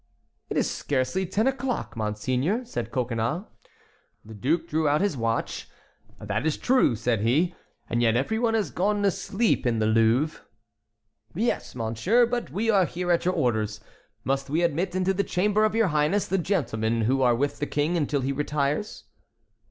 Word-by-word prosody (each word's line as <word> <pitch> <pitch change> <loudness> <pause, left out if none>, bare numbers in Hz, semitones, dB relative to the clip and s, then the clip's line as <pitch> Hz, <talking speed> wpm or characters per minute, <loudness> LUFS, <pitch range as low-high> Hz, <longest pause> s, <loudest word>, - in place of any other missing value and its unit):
"It - - -2
is - - +2
scarcely 140 +7 -1
ten 205 +5 0
o'clock, 265 -2 -2
monseigneur," 125 - -1
said 120 - -4
Coconnas. 120 - -1 0.8
The 110 - -10
duke 160 - 0
drew 155 -1 0
out 145 +1 +3
his 200 -6 0
watch. 115 -2 -2 0.5
"That - - -2
is 160 -1 0
true," 255 - +3
said 115 -1 0
he. 150 +11 +2 0.3
"And 120 - 0
yet 115 -1 +3
every 180 - 0
one 230 -1 +1
has 205 -9 0
gone 205 +3 0
to 200 - +4
sleep 205 +5 0
in 115 -1 +1
the 110 - +1
Louvre." 115 +7 +2 0.9
"Yes, 225 - -1
monsieur, 120 - +2
but 240 0 -3
we 215 +4 -2
are 195 -3 +4
here 175 +1 -2
at 170 0 +2
your 180 - +1
orders. 110 - 0 0.4
Must 135 0 -1
we 160 +4 +1
admit 170 +3 0
into 185 +1 +1
the 200 +1 0
chamber 210 +4 +2
of 215 - 0
your 225 -4 +3
highness 155 +6 +1
the 195 - 0
gentlemen 115 - 0
who 130 +5 +1
are 120 -2 +4
with 140 +4 -1
the 145 - -2
King 150 +4 0
until 145 -3 0
he 135 +2 -1
retires?" 145 +6 -2
150 Hz, 175 wpm, -26 LUFS, 120-195 Hz, 0.9 s, to